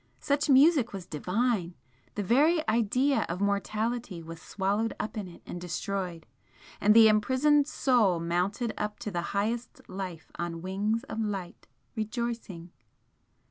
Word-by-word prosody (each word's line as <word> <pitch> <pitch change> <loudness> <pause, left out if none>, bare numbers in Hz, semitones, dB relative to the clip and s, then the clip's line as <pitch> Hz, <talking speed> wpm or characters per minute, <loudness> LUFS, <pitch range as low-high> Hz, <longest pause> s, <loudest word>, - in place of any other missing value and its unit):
Such 290 0 0
music 275 -3 +5
was 190 -3 -6
divine! 180 +2 -1 0.4
the 205 - -2
very 310 - +3
idea 245 +5 +2
of 170 +2 -3
mortality 205 -1 -1
was 165 +1 -9
swallowed 205 +3 -1
up 215 - -4
in 210 -3 -4
it 175 - -14
and 175 - -7
destroyed, 180 0 -4 0.6
and 210 +2 +5
the 225 -1 +9
imprisoned 260 +7 +3
soul 225 - +2
mounted 180 +7 -1
up 210 0 -3
to 210 - -4
the 175 -2 -1 0.2
highest 230 +4 -3
life 185 -4 -7
on 170 -1 -4
wings 205 +5 -1
of 220 - -6
light, 195 -5 -5 0.3
rejoicing! 220 -6 -4
210 Hz, 140 wpm, -29 LUFS, 180-235 Hz, 0.6 s, the